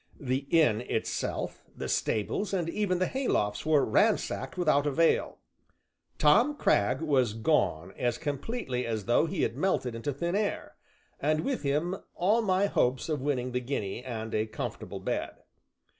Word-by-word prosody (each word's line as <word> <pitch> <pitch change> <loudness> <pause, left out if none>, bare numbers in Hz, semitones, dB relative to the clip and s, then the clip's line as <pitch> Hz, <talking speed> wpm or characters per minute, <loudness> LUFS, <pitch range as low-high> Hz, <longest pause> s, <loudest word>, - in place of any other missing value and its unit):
The 135 0 -2
inn 135 -10 +4
itself, - - -3
the - - -4
stables, 195 - -1
and 175 -3 -1
even 185 +1 0
the 185 - +1
haylofts 130 - -1
were 150 -3 +4
ransacked 190 - +1
without 150 -4 +2
avail. 160 +3 +2 0.8
Tom 230 - +4
Cragg 100 - +2
was 130 -8 +2
gone 95 - +1
as 120 -1 -1
completely 145 - -3
as 110 -3 -3
though 120 +7 +3
he - - -1
had 115 - 0
melted 140 -6 0
into 115 +5 -3
thin 170 +6 -2
air, 205 0 -2 0.4
and 155 +2 +1
with 270 +4 -2
him 155 +6 0 0.2
all 210 +6 +3
my 195 -2 +2
hopes 130 -8 +1
of 150 -4 -1
winning 130 -3 -1
the 125 - 0
guinea 120 -4 -3
and 110 -3 -5
a 110 +1 0
comfortable - - -5
bed. - - -2
145 Hz, 155 wpm, -29 LUFS, 120-180 Hz, 0.8 s, inn